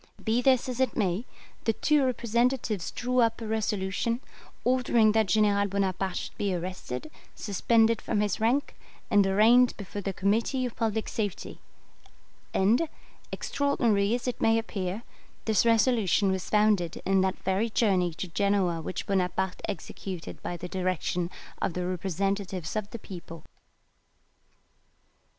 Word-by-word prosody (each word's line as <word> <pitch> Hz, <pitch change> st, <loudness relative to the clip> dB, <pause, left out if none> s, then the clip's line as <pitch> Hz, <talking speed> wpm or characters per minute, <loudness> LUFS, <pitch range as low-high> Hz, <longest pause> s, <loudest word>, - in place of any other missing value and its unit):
Be 230 Hz, +2 st, +2 dB
this 260 Hz, -1 st, +3 dB
as 255 Hz, -1 st, -4 dB
it 260 Hz, -3 st, +1 dB
may, 200 Hz, +1 st, 0 dB, 0.4 s
the 225 Hz, -, +3 dB
two 300 Hz, +5 st, +2 dB
representatives 235 Hz, -5 st, 0 dB
drew 250 Hz, +1 st, -1 dB
up 230 Hz, -2 st, +3 dB
a 230 Hz, -, -6 dB
resolution, 215 Hz, +1 st, -1 dB, 0.4 s
ordering 240 Hz, -3 st, +3 dB
that 220 Hz, -1 st, +2 dB
General 200 Hz, +1 st, +3 dB
Bonaparte 195 Hz, -1 st, -1 dB
should -, -, -6 dB
be 200 Hz, -3 st, 0 dB
arrested, 170 Hz, -6 st, -5 dB, 0.2 s
suspended 225 Hz, +2 st, +2 dB
from 215 Hz, -, -1 dB
his 205 Hz, -2 st, 0 dB
rank, 240 Hz, +6 st, +1 dB, 0.4 s
and 200 Hz, -1 st, +5 dB
arraigned 230 Hz, +6 st, +5 dB
before 205 Hz, 0 st, -6 dB
the 195 Hz, -, -2 dB
Committee 225 Hz, +7 st, 0 dB
of 245 Hz, -, -5 dB
Public 220 Hz, -1 st, -1 dB
Safety; 205 Hz, -5 st, -4 dB, 0.9 s
and, 230 Hz, +12 st, +2 dB, 0.4 s
extraordinary 235 Hz, -7 st, +1 dB
as 245 Hz, -, -4 dB
it 250 Hz, -, -3 dB
may 225 Hz, 0 st, +4 dB
appear, 205 Hz, -2 st, -3 dB, 0.4 s
this 220 Hz, +1 st, +3 dB
resolution 225 Hz, -4 st, +3 dB
was 190 Hz, -1 st, -3 dB
founded 210 Hz, -5 st, +2 dB
in 195 Hz, 0 st, +3 dB
that 190 Hz, 0 st, 0 dB
very 190 Hz, +5 st, +1 dB
journey 190 Hz, -6 st, +2 dB
to 185 Hz, -, -4 dB
Genoa 185 Hz, -2 st, +1 dB
which 185 Hz, -, -4 dB
Bonaparte 190 Hz, -1 st, -1 dB
executed 185 Hz, -3 st, -6 dB
by 175 Hz, -, -4 dB
the 180 Hz, -, -6 dB
direction 180 Hz, -1 st, -1 dB, 0.3 s
of 175 Hz, -, 0 dB
the 180 Hz, +1 st, -2 dB
representatives 185 Hz, 0 st, -2 dB
of 210 Hz, -1 st, -2 dB
the 235 Hz, -, -6 dB
people. 170 Hz, -6 st, -10 dB
205 Hz, 140 wpm, -28 LUFS, 190-230 Hz, 0.9 s, and